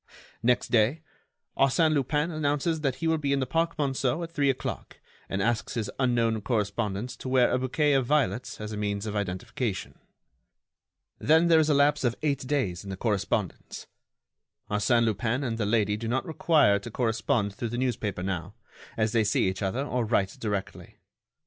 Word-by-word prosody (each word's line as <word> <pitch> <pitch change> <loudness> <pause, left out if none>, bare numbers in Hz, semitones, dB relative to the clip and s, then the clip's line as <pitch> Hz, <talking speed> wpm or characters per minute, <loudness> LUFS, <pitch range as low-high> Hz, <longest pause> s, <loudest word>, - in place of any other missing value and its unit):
Next 120 +1 +2
day, 120 +8 +2 0.5
Arsène 155 +4 +3
Lupin 150 +3 0
announces 155 +1 0
that 135 -4 0
he 165 +5 -3
will 160 -1 +2
be 140 -2 0
in 140 - +1
the 130 - 0
Park 165 +5 0
Monceau 135 +1 0
at 165 - -7
three 145 -4 +1
o'clock, 130 -2 -4 0.3
and 95 0 -1
asks 115 -1 -1
his 110 -4 -2
unknown 115 -4 +1
correspondent 105 0 -1
to 130 - -5
wear 130 -1 +4
a 125 - +1
bouquet 145 +3 +1
of 135 -3 +2
violets 140 -4 0
as 105 0 -5
a 105 - -5
means 100 0 -2
of 105 -1 -4
identification. 100 +3 -3 1.2
Then 160 +3 +4
there 165 -1 +6
is 155 0 +2
a 150 - +4
lapse 145 +1 +3
of 120 -2 +1
eight 140 -4 -1
days 110 - -1
in 100 - -9
the 95 - -5
correspondence. 105 -2 -2 0.9
Arsène 115 +3 +3
Lupin 115 +4 0
and 115 -3 -2
the 105 - 0
lady 105 -2 +2
do 115 +1 -5
not 125 +7 0
require 150 - +3
to 110 - -8
correspond 110 -2 0
through 115 +3 -4
the 120 - -4
newspaper 105 -7 -2
now, 95 +1 -4 0.4
as 110 -1 +1
they 115 -1 +3
see 105 -2 +2
each 95 +1 -3
other 115 +8 -1
or 125 -4 -1
write 100 -4 0
directly. 100 -3 -4
120 Hz, 180 wpm, -27 LUFS, 105-140 Hz, 1.2 s, there